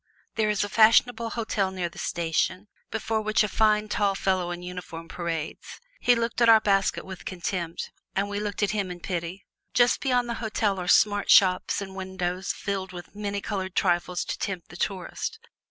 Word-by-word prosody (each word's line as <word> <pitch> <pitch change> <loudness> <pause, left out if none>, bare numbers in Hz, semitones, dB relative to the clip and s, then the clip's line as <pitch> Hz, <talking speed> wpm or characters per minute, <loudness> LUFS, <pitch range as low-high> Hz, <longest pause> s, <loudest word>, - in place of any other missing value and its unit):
There 215 -2 +1
is 210 -1 +1
a - - -2
fashionable 230 +2 +4
hotel 220 -4 -1
near 185 -2 -3
the 170 - -11
station, 170 +4 -1 0.2
before 220 0 -1
which 215 +1 +2
a - - +1
fine 215 +1 +2
tall 200 -2 +1
fellow 185 -2 0
in 175 0 -5
uniform 180 -2 -7
parades. 165 -2 -5 0.2
He 245 - +4
looked 230 0 -2
at 235 - +6
our 225 -1 +9
basket 195 -2 +1
with 190 -1 -8
contempt, 175 -2 -4 0.2
and 195 +1 +1
we 205 0 -3
looked 205 0 -2
at 205 - +2
him 200 -3 -1
in 180 0 -7
pity. 175 +1 -4 0.3
Just 245 0 +4
beyond 250 -3 +1
the 235 - -2
hotel 210 -3 0
are 180 - -4
smart 205 +1 +4
shops 185 -2 +5
with 195 - -5
windows 190 -1 -3
filled 195 -2 -4
with 175 +1 -9
many 205 -1 -3
colored 190 -3 -4
trifles 175 -1 +1
to - - -4
tempt 185 -4 -4
the - - -11
tourist. 190 - -3
195 Hz, 185 wpm, -26 LUFS, 180-215 Hz, 0.3 s, our